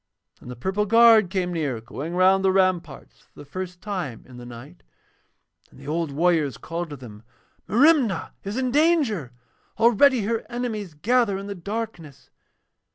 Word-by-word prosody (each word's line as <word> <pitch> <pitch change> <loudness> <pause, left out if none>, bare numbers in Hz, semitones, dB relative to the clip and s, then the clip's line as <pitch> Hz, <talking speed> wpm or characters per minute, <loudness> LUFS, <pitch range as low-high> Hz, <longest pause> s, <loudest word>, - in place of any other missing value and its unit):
Then - - -12
the 125 - -7
purple 190 - -2
guard 225 -2 +6
came 180 -1 -2
near, 145 -8 -2
going 150 +9 -7
round 190 +1 +4
the 190 - +3
ramparts 185 -6 -1
for - - -31
the - - -11
first 180 +4 -7
time 180 - -5
in 125 -1 -13
the 120 0 -10
night, 120 - -12 0.9
and - - -18
the 140 - -12
old 160 0 -2
warriors 160 -2 +1
called 170 0 -5
to 145 - -7
them, 115 -6 -12 0.5
'Merimna 245 - +3
is 200 +4 -5
in 255 -1 -1
danger! 285 - +1 0.5
Already 240 +3 +4
her 225 +2 -2
enemies 220 -8 -4
gather 225 +4 +1
in 195 - -7
the 200 - -5
darkness.' 180 - -7
185 Hz, 160 wpm, -24 LUFS, 150-225 Hz, 0.9 s, guard